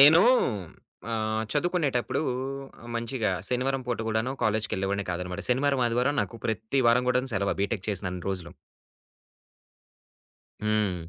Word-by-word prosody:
నేను 155 +5 +9 0.9
ఆహ్, 110 0 0
చదువుకునేటప్పుడు 150 -5 +1 0.7
మంచిగా 115 -1 -1 0.2
శనివారం 130 +2 0
పూట 120 -1 -1
కూడాను 110 +3 0
కాలేజీకెళ్ళేవాడినే 100 -2 0
కాదనమాట. 90 +1 -3
శనివారం, 135 +2 +2
ఆదివారం 125 +4 +1
నాకు 115 - -6
ప్రతి 110 +3 -1
వారం 120 +2 +5
కూడాను 125 +1 +1
సెలవు. 100 +1 +1
ఆ - - -14
బిటెక్ 100 -1 -1
చేసినన్ని 90 -3 -1
రోజులు. 90 -3 -3 2.1
హ్మ్. 105 -6 0
115 Hz, 115 wpm, -27 LUFS, 100-125 Hz, 2.1 s, నేను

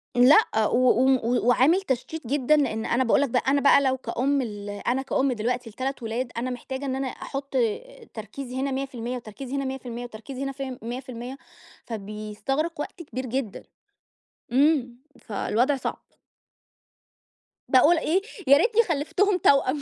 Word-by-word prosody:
لأ، 255 - +5
و - - +1 0.2
و 255 - +3
و 240 0 0
و 240 - 0
وعامل 280 +10 +4
تشتيت 270 -2 -3
جدًا، 280 +3 +3
لأن 225 -6 0
أنا 260 +2 +2
باقول 240 - +3
لك 285 - +1
بقى 250 - +1
أنا 280 +1 +3
بقى 280 0 +6
لو 265 -1 +1
كأم 270 +2 0
ال 205 -4 -6
أنا 245 +6 -1
كأم 270 0 0
دلوقتي 245 +1 -2
ل3 260 +3 -4
ولاد، 230 +2 -3
أنا 250 +2 -2
محتاجة 265 +2 -5
إن 260 -1 -1
أنا 270 0 -2
أحُطّ 275 +1 -6
آآ، 465 - -2
تركيزي 240 +4 -7
هنا 275 0 -1
100%، 255 -2 -4
وتركيزي 250 +3 -7
هنا 275 -1 -1
100%، 245 -2 -5
وتركيزي 245 +4 -7
هنا 275 - -2
فيم 265 -2 -6
100%، 250 +2 -6 0.5
فبيستغرِق 220 +9 -4
وقت 340 +3 -6
كبير 260 -4 -5
جدًا. 250 -3 -3 0.9
امم، 265 -2 +3 0.2
فالوضع 245 +6 0
صعب. 260 - -4 1.7
باقول 290 +6 +6
إيه، 330 +4 +1 0.3
يا 280 +1 +8
ريتني 455 +8 +4
خَلفتهُم 360 +3 +1
توأم. 280 -2 +3
260 Hz, 155 wpm, -25 LUFS, 240-280 Hz, 1.7 s, يا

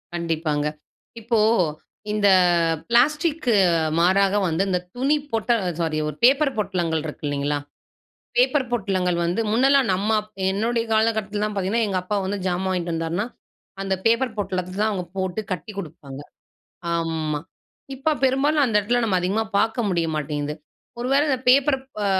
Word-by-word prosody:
கண்டிப்பாங்க. 160 -3 -1 0.5
இப்போ, 230 0 +1 0.7
இந்த 210 -1 +2 0.6
பிளாஸ்டிக் 300 +5 +2 0.5
மாறாக 190 +3 +3
வந்து 165 +4 +1
இந்த 180 -1 +1 0.2
துணி 275 +5 +2
பொட்டல் 225 0 +1 0.2
சாரி 160 -2 -1
ஒரு 150 - -5
பேப்பர் 275 +3 +4
பொட்டலங்கள் 175 -6 -1
இருக்குல்லைங்களா? 145 -1 -2 0.8
பேப்பர் 305 - +3
பொட்டலங்கள் 185 -6 0
வந்து 175 +6 0
முன்னலாம் 270 +2 +4
நம்ம 215 +4 +1 0.3
என்னுடைய 230 +4 0
காலகட்டத்துலலாம் 215 -1 0
பார்த்தீங்கன்னா, 205 +4 0
எங்க 190 -2 0
அப்பா 205 +3 -2
வந்து 200 +2 -2
ஜாமான் 185 +1 -1
வாங்கிட்டு 175 -2 -2
வந்தாருன்னா, 165 +6 -2 0.6
அந்த 195 -1 0
பேப்பர் 230 +1 +2
பொட்டலத்த 185 -2 -3
தான் 215 +1 +2
அவங்க 190 -4 -3
போட்டு 190 +2 -2
கட்டிக் 190 +4 -6
குடுப்பாங்க. 145 -5 -10 0.8
ஆமா 160 -2 -2 0.6
இப்ப 275 +4 0
பெரும்பாலும் 275 +3 +3
அந்த 225 -5 +1
இடத்துல 240 +4 0
நம்ம 200 -4 +1
அதிகமா 195 +5 0 0.2
பார்க்க 225 +3 +1
முடிய 170 -3 0
மாட்டேங்குது. 150 0 -3 0.5
ஒரு 245 - -2
வேள 280 +1 +4
இந்த 265 -2 +1
பேப்பர் 270 +2 +5 0.3
ஆ - - +1
200 Hz, 140 wpm, -23 LUFS, 170-235 Hz, 0.8 s, பேப்பர்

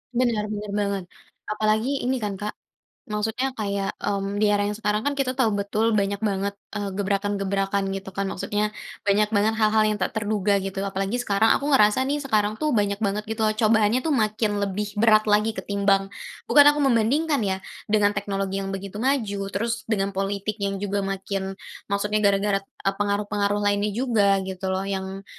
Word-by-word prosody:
Benar 235 -4 +1
benar 210 -1 -5
banget. 200 -2 -1 0.4
Apalagi 215 +6 0
ini 260 +2 +1
kan 200 -2 -2
Kak 210 0 -4 0.5
maksudnya 220 +5 -2
kayak, 200 -2 -2
mmm, 200 0 -1
di 210 0 +3
era 205 0 +1
yang 210 - -3
sekarang 210 -1 0
kan 285 +3 -1
kita 260 -2 0
tahu 230 -6 +1
betul, 215 +2 +1
banyak 200 0 0
banget, 200 -1 -1 0.2
eee, 200 -2 -3
gebrakan-gebrakan 195 0 -1
gitu 195 -1 -8
kan, 195 +1 -2
maksudnya 210 +3 -1 0.3
banyak 210 +2 +2
banget 215 +2 +2
hal-hal 215 0 +3
yang 210 - 0
tak 190 - -2
terduga 205 -2 +1
gitu. 195 +1 -4
Apalagi 195 +3 -2
sekarang 220 -2 +2
aku 285 +1 -1
ngerasa 215 +1 +4
nih, 290 +2 -1
sekarang 215 -5 0
tuh 305 - +1
banyak 205 0 0
banget 210 0 -1
gitu 220 0 -5
loh, 215 - -1
cobaannya 220 +2 +3
tuh 315 - +1
makin 215 -3 +1
lebih 205 +1 -2
berat 215 -1 +5
lagi 210 +1 +2
ketimbang 200 -1 +1 0.3
bukan 285 +4 +7
aku 295 -1 +3
membandingkan 270 +5 +2
ya. 190 -2 -2 0.2
Dengan 205 -1 +3
teknologi 195 -1 -2
yang 195 - -4
begitu 200 +2 -7
maju, 230 -7 0
terus 230 +5 -3
dengan 200 -3 0
politik 200 +2 -3
yang 195 0 -1
juga 200 0 -2
makin 195 0 -3 0.3
maksudnya 210 +1 0
gara-gara 200 0 +2
e 195 0 -3
pengaruh-pengaruh 205 0 0
lainnya 205 +1 +2
juga, 210 -3 +2
gitu 190 0 -4
loh. 190 +1 -1
Yang, 195 0 -4
205 Hz, 175 wpm, -24 LUFS, 195-220 Hz, 0.5 s, bukan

